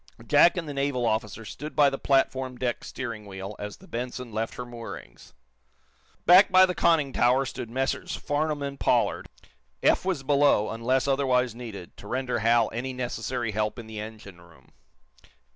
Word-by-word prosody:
Jack 175 Hz, -, +5 dB
and 165 Hz, -3 st, -3 dB
the 145 Hz, -, -5 dB
naval 140 Hz, -3 st, -1 dB
officer 110 Hz, -1 st, -2 dB
stood 150 Hz, +7 st, -8 dB
by 145 Hz, -2 st, +6 dB
the 135 Hz, 0 st, -1 dB
platform 130 Hz, -2 st, +1 dB
deck 120 Hz, -1 st, -2 dB
steering 115 Hz, -5 st, -6 dB
wheel 95 Hz, +1 st, -7 dB
as 105 Hz, 0 st, -6 dB
the -, -, -17 dB
"Benson" 125 Hz, 0 st, -5 dB
left 110 Hz, +1 st, -3 dB
her 125 Hz, -, -6 dB
moorings. 115 Hz, -, -10 dB, 0.9 s
Back 185 Hz, +3 st, +7 dB
by 185 Hz, 0 st, +8 dB
the 180 Hz, -, -2 dB
conning 155 Hz, -7 st, +2 dB
tower 125 Hz, +3 st, +3 dB
stood 120 Hz, -2 st, -6 dB
Messrs. 130 Hz, +3 st, -2 dB
Farnum 145 Hz, 0 st, -1 dB
and 140 Hz, 0 st, -5 dB
Pollard. -, -, +1 dB, 0.5 s
Eph -, -, +4 dB
was 180 Hz, -7 st, -1 dB
below, 140 Hz, -6 st, +3 dB
until 130 Hz, +4 st, +1 dB
otherwise 125 Hz, -3 st, +1 dB
needed, 110 Hz, -7 st, -9 dB
to 100 Hz, -, -11 dB
render 125 Hz, 0 st, -1 dB
Hal 115 Hz, +1 st, +3 dB
any 130 Hz, +3 st, -3 dB
necessary 125 Hz, -2 st, -3 dB
help 105 Hz, +1 st, -1 dB
in 120 Hz, -, -8 dB
the 110 Hz, -1 st, -8 dB
engine 105 Hz, -4 st, -9 dB
room. 80 Hz, -6 st, -20 dB
125 Hz, 170 wpm, -26 LUFS, 110-140 Hz, 0.9 s, by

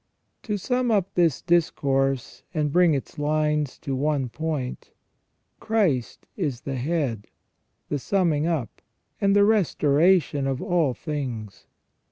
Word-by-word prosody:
To 210 Hz, -2 st, -2 dB
sum 250 Hz, +5 st, 0 dB
up 200 Hz, -4 st, +1 dB
this 170 Hz, -5 st, +2 dB
discourse, 135 Hz, -6 st, +1 dB
and 150 Hz, -2 st, 0 dB
bring 175 Hz, -1 st, +4 dB
its 135 Hz, -, -6 dB
lines 150 Hz, -1 st, 0 dB
to 135 Hz, -, -3 dB
one 140 Hz, -2 st, 0 dB
point, 150 Hz, -2 st, -4 dB, 0.7 s
Christ 190 Hz, -, 0 dB
is 130 Hz, -4 st, -2 dB
the 135 Hz, -2 st, -4 dB
head, 130 Hz, -6 st, -2 dB, 0.6 s
the 145 Hz, -, -2 dB
summing 165 Hz, -2 st, +1 dB
up, 155 Hz, -10 st, -3 dB, 0.4 s
and 200 Hz, 0 st, +3 dB
the 200 Hz, 0 st, +6 dB
restoration 165 Hz, -6 st, +3 dB
of 135 Hz, -1 st, -1 dB
all 165 Hz, -8 st, +1 dB
things. 120 Hz, -10 st, -5 dB
150 Hz, 125 wpm, -25 LUFS, 135-175 Hz, 0.7 s, the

